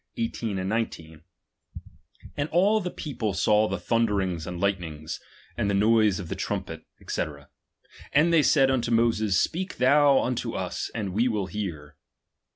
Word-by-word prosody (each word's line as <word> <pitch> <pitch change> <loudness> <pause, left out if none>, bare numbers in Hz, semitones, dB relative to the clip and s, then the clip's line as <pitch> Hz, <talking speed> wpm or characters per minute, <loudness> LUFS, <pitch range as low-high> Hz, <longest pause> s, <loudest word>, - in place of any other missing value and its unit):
4nd 100 -7 -3 1.3
all 200 +6 +3
the 180 - -3
people 115 - -4
saw 105 +3 +3
the 95 - -2
thunderingti 95 -5 0
and 90 -1 -5
lightenings, 85 -6 -2 0.4
and 100 - -1
the 100 - +1
noise 110 -1 +3
of 90 - -6
the - - -4
trumpet, - - -4 0.3
&c. - - 0 0.9
And 160 +4 +3
they 165 - +6
said 135 -2 +4
unto 120 -3 0
Moses, 115 -4 +2
speak 185 +3 -2
thou 140 +2 +5
unto 125 -1 -2
us, - - -3
and 100 -5 -3
we 115 +5 +2
will 105 -5 -1
hear. 85 -7 -6
110 Hz, 140 wpm, -26 LUFS, 95-125 Hz, 1.3 s, they